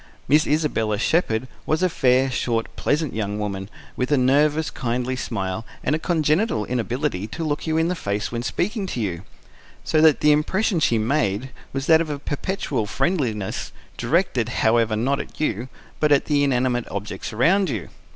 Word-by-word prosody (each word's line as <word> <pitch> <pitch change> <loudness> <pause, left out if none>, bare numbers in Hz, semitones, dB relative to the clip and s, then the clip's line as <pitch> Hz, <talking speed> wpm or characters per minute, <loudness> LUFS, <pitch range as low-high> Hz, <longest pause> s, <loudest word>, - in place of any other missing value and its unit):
Miss 150 +3 +4
Isabella 125 -9 +1
Shepherd 125 - +1 0.2
was 155 +3 +1
a - - +5
fair, 130 -4 +2
short, 115 -2 -1
pleasant 150 0 0
young 105 -1 -2
woman, 100 -2 -4 0.3
with 125 +3 -2
a 145 - +4
nervous, 145 +4 +3
kindly 125 +1 -2
smile, 110 -4 -3 0.2
and - - +1
a 155 - +1
congenital 160 - +1
inability 120 - -2
to 165 +9 -5
look 150 +1 -2
you 160 0 +1
in 165 +1 +2
the 180 - 0
face 105 - -3
when 120 0 -2
speaking 195 - -2
to 125 - -4
you; 90 -6 -2 0.6
so 155 - +2
that 155 -2 +5
the 150 - +5
impression 180 +6 +1
she 120 -6 +2
made 110 0 0 0.2
was 135 0 -3
that 160 +1 +6
of 160 - -3
a 145 - -2
perpetual 145 - -2
friendliness, 115 - -1 0.2
directed, 130 - +1
however, 115 -2 +2
not 135 +6 0
at - - -8
you, 120 -4 -1 0.3
but 150 -1 +2
at 140 - +4
the 145 -2 +2
inanimate 125 -3 +1
objects 100 -1 -5
around 175 - +3
you. 110 -9 -4
130 Hz, 175 wpm, -23 LUFS, 110-155 Hz, 0.6 s, that